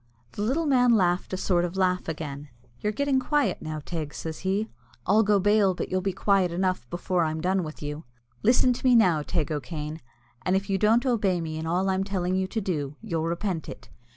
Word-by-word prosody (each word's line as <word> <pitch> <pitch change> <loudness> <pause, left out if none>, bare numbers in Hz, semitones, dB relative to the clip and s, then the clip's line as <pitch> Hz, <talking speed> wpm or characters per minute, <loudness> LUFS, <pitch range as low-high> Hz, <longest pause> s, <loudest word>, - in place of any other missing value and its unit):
The - - -6
little 270 +10 0
man 250 -4 +4
laughed 180 -3 +1
a 185 - -2
sort 180 -2 +1
of 175 +2 -3
laugh 185 -1 +1
again. 150 -3 -5 0.3
"You're 210 - -1
getting 275 +4 +1
quiet 295 +1 0
now, 155 -1 -5
Teig," 155 -4 -5
says 160 -1 -5
he. 195 +3 -1 0.4
"I'll 210 +4 +4
go 205 -2 +3
bail 205 -1 +3
but - - -4
you'll 185 0 0
be 195 +1 0
quiet 195 -1 +2
enough 185 -8 -1
before 175 0 0
I'm 160 0 -1
done 185 +3 +1
with 155 -1 -8
you. 150 +2 -5 0.4
Listen 250 +2 +4
to - - -8
me 255 -2 +5
now, 180 -9 +4
Teig 155 0 -2
O'Kane, 150 +2 -4 0.4
and 185 - +1
if 195 +1 -1
you 195 - +1
don't 225 +5 +3
obey 205 -8 +1
me 160 -1 -4
in 160 - -4
all 180 +3 +1
I'm 190 0 +1
telling 185 -2 -1
you 190 0 0
to 220 - -2
do, 150 -8 -3
you'll 165 -7 -2
repent 170 -1 -2
it. - - -10
185 Hz, 215 wpm, -26 LUFS, 160-210 Hz, 0.4 s, me